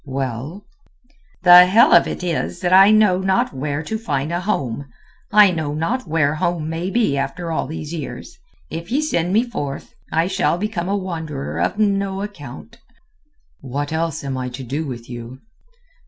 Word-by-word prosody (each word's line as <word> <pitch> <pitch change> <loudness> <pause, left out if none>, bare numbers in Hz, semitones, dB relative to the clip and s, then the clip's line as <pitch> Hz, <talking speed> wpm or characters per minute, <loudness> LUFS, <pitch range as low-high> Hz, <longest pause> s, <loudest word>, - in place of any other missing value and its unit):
"Well?" 135 - -4 0.8
"The 180 0 +9
hell 230 - +5
of - - +6
it - - -5
is 145 - -2
that 175 - +1
I 195 +2 +8
know 210 -4 +4
not 190 -4 +1
where 145 +3 -3
to 220 +8 -4
find 150 -7 -2
a 175 - -1
home, 140 - -3 0.4
I 210 -2 +7
know 155 -4 -3
not 195 +9 -2
where 155 -2 +1
home 155 0 -1
may 165 +3 -3
be 205 -11 +1
after 165 +5 -3
all 160 - -1
these 155 +1 -6
years. 170 - -7 0.4
If 170 +4 -6
ye 270 - +2
send 180 - 0
me 220 +4 +3
forth, 145 - -6 0.2
I 165 +1 +2
shall 190 -2 0
become 190 -2 -3
a 200 - +1
wanderer 160 - -5
of 85 - 0
no 200 -2 0
account." 200 - -10 0.8
"What 145 +3 -4
else 160 -2 -2
am 135 -2 -3
I 125 0 -3
to 125 +2 -8
do 145 +6 -3
with 120 -3 -7
you?" 120 +1 -8
165 Hz, 175 wpm, -20 LUFS, 140-195 Hz, 0.8 s, The